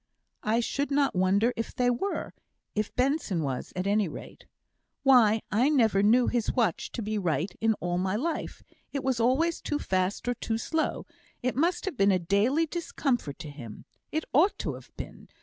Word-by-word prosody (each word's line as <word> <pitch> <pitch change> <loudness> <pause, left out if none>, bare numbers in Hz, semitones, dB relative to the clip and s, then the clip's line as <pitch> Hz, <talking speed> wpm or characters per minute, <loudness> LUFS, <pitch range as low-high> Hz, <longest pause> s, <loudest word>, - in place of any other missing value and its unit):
"I 225 +3 +1
should 280 +4 -1
not 280 -1 +2
wonder 195 +6 +3
if 230 - -4
they 250 -1 +2
were 390 +12 -3 0.4
if 210 0 -1
Benson 250 - +1
was, 130 -3 -3
at 185 0 -2
any 205 0 +2
rate. 155 - -10 0.6
Why, 230 -5 +5
I 240 +7 +3
never 225 -9 +3
knew 235 +5 +5
his 240 -3 0
watch 225 - 0
to 230 - -3
be 215 0 -1
right 170 -1 -1
in 220 0 +3
all 175 -1 -2
my 190 +2 0
life 315 +9 -3 0.3
it 280 -1 -3
was 260 -3 0
always 275 +9 +2
too 295 - -1
fast 185 -3 -1
or 245 - +2
too 225 -1 -2
slow; 315 +7 -1 0.4
it 255 - 0
must 340 +6 +1
have 385 -9 -4
been 200 -1 +4
a 185 - +4
daily 205 - +2
discomfort 275 - -2
to 150 - -7
him. 120 -7 -10 0.3
It 315 0 -1
ought 345 +9 +4
to - - -3
have - - -11
been. - - -9
230 Hz, 185 wpm, -28 LUFS, 195-275 Hz, 0.6 s, Why